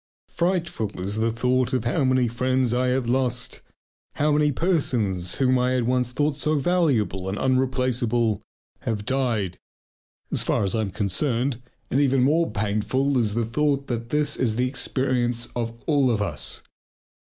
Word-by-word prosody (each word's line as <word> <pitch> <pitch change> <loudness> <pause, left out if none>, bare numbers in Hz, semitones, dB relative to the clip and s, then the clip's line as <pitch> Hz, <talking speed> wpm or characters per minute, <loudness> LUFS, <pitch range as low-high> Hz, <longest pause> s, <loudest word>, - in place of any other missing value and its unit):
Frightful 170 - -2
is 100 +3 -1
the 115 +1 +1
thought 125 +1 0
how 130 +5 +1
many 130 -1 +3
friends 125 +1 +1
I 125 +1 +1
have 125 -1 0
lost, 125 0 0 0.5
how 150 +1 +1
many 150 0 +3
persons 120 - 0
whom 130 -1 +2
I 125 +1 +1
had 125 -1 +1
once 125 0 +1
thought 145 +3 0
so 150 +1 +1
valuable 135 - +1
and 100 - -3
unreplaceable 125 -4 +1 0.4
have 105 -2 -3
died 120 -9 -1 0.7
as - - +1
far - - +1
as 95 - -1
I 110 - +1
am 105 - -2
concerned. 120 - 0 0.3
And 135 - +2
even 135 -2 +3
more 160 +5 +2
painful 110 +7 0
is 110 -3 +1
the 115 -1 +1
thought 140 +3 0
that 115 -1 -3
this 150 +1 +1
is 115 -4 +1
the 125 +2 +1
experience 125 -2 0
of 115 -1 -3
all 140 -5 +3
of 115 -3 +1
us. 90 -7 -2
125 Hz, 160 wpm, -24 LUFS, 115-135 Hz, 0.7 s, many